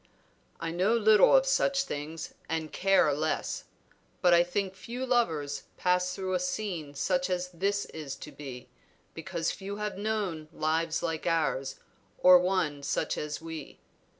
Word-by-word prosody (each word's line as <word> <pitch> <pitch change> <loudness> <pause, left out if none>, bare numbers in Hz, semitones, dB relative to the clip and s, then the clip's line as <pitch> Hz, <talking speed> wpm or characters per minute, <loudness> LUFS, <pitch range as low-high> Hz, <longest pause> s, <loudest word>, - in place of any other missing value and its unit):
"I 165 -1 -3
know 185 +7 +2
little 215 - +6
of - - +3
such 275 - +2
things 155 - -6 0.2
and 160 -1 -3
care 195 -4 +4
less; 155 +2 -2 0.5
but 175 -1 +5
I 170 0 +7
think 190 +2 -2
few 235 +7 -5
lovers 160 - 0
pass 180 0 +1
through 185 -1 -3
a 180 - +2
scene 180 -5 -3
such 180 +5 0
as 180 0 -1
this 200 +3 -1
is 150 -4 -7
to 150 - -10
be, 135 -3 -9 0.5
because 165 0 -2
few 200 +1 -6
have 210 -1 -4
known 200 -7 -2
lives 160 +1 0
like 165 -1 -2
ours, 145 -5 0 0.4
or 180 0 +8
one 180 -6 0
such 140 - -1
as 150 +1 -4
we. 160 -1 -7
175 Hz, 150 wpm, -29 LUFS, 155-195 Hz, 0.5 s, or